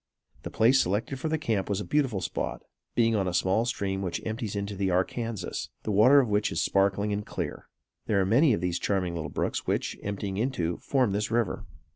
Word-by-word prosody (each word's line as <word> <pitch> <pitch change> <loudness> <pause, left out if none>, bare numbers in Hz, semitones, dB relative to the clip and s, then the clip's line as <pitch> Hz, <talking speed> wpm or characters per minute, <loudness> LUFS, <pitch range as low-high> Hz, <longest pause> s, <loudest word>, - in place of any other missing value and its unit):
The - - -6
place 130 +4 +4
selected 105 +8 -1
for 160 - -2
their 160 - +1
camp 110 -10 -1
was 100 -1 0
a 105 - -4
beautiful 135 -10 +1
spot, - - -3 0.3
being 115 -1 +3
on 100 -3 +1
a 90 - -1
small 95 +6 +2
stream 95 -5 -2
which 90 -3 -2
empties 110 -2 -3
into 100 0 -3
the 95 0 0
Arkansas, 95 +2 -2 0.2
the 110 - -2
water 125 +8 +7
of 130 - +2
which 105 0 +1
is - - -1
sparkling 100 +1 +2
and 105 +1 -2
clear. - - -5 0.4
There 105 - +2
are 95 - +2
many 130 - +4
of 95 - -1
these 90 -1 -1
charming 95 -3 0
little 80 -3 -4
brooks - - -2
which, - - -1
emptying 100 -1 -4
into, 100 -8 -1
form 130 -6 +1
this 105 +2 -1
river. 115 -2 -1
105 Hz, 210 wpm, -28 LUFS, 95-115 Hz, 0.4 s, water